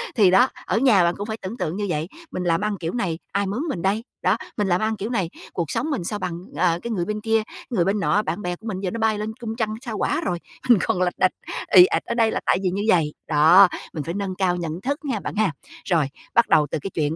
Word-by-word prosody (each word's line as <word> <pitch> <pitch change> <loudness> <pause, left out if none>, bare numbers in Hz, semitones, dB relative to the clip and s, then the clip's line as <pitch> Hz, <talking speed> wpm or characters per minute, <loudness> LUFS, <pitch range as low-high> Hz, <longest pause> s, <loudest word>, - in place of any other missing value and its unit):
Thì 200 -6 +5
đó, 195 +7 +6 0.2
ở - - 0
nhà 225 -7 +5
bạn 170 0 +2
cũng 205 - -4
phải 220 0 -4
tưởng 195 +5 -6
tượng 175 -5 -2
như 205 - -1
vậy. 155 -1 -1 0.2
Mình 185 - -3
làm 170 -1 +1
ăn 210 -1 -1
kiểu 165 +1 -3
này, 175 -9 -2
ai 200 0 0
mướn 205 +7 -2
mình 175 -11 -3
đây? 200 +4 0 0.2
Đó, 185 +5 +2 0.2
mình 205 -2 +1
làm 180 +2 +2
ăn 220 0 0
kiểu 205 +3 -4
này, 190 -9 -1 0.2
cuộc 170 -4 -2
sống 315 - -1
mình 265 -11 -2
sao 205 +4 -3
bằng, 170 -3 -4 0.2
ờ, 170 +1 +2
cái 235 - -3
người 180 -6 -1
bên 210 +2 -3
kia, 225 0 +1
cái - - -13
người 185 -9 +1
bên 200 +2 +1
nọ? 205 +1 +2
Bạn 210 - -3
bè 180 -2 -2
của 220 +6 -12
mình 190 -4 -3
giờ 190 -2 -2
nó 230 - -4
bay 220 -1 +2
lên 215 +1 -4
cung 225 -2 -5
trăng, 220 -2 -1
Sao 230 -5 -5
Hỏa - - 0
rồi, 175 -2 -2 0.3
mình 235 -5 +7
còn 180 - 0
lạch 180 -1 +1
đạch, 185 - +4 0.4
ì 180 -1 +11
ạch - - -1
ở - - -2
đây 225 -2 +3
là - - -1
tại - - +3
vì 185 - +2
như 195 +3 -2
vầy. 160 -6 +3
Đó, 160 +6 +7 0.3
mình 155 - -3
phải 165 - -4
nâng 195 -1 -3
cao 185 -2 +1
nhận 170 0 -4
thức 280 +6 -3
nha 250 -7 -1
bạn - - -6
ha. 210 -4 +2 0.4
Rồi, 165 -5 +3 0.3
bắt 235 - +4
đầu 150 -1 +4
từ - - -1
cái 195 - -4
chuyện 155 -1 0
195 Hz, 285 wpm, -23 LUFS, 175-220 Hz, 0.4 s, ì